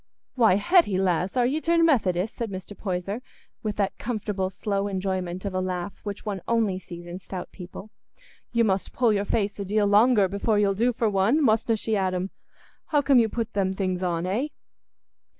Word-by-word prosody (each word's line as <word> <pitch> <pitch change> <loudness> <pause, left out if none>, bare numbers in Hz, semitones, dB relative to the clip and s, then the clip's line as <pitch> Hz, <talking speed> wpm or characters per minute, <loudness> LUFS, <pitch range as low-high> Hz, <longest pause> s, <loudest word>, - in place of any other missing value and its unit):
"Why, 225 -7 +4
Hetty, 205 - +3
lass, 185 +3 0
are 245 - +4
ye 290 +5 0
turned 335 0 +3
Methodist?" 210 - +2
said 235 -3 -4
Mr. 190 +1 -7
Poyser, 195 +4 -3 0.4
with 215 -2 -3
that 200 -2 0
comfortable 210 -5 -2
slow 200 +1 -2
enjoyment 185 -1 -3
of 200 - -3
a 185 - 0
laugh 185 +1 -4
which 205 0 -6
one 200 -3 -3
only 220 -5 +1
sees 175 -1 -10
in 175 +1 -7
stout 185 -1 -7
people. 190 +3 -10 0.6
"You 235 -1 +3
must 195 -3 0
pull 240 -3 +3
your 200 0 0
face 205 -1 -1
a - - -1
deal 205 +2 +1
longer 205 0 +5
before 200 +3 0
you'll 200 -1 +3
do 235 +5 +2
for 230 -1 0
one; 210 +9 +2
mustna 225 0 +3
she, 220 0 -1
Adam? 185 -1 -1 0.6
How 295 -2 +2
come 275 -3 +5
you 225 -2 +3
put 230 +1 -3
them 190 -1 0
things 185 -2 -1
on, 175 -2 -1
eh?" 215 +10 0
200 Hz, 190 wpm, -25 LUFS, 185-225 Hz, 0.6 s, longer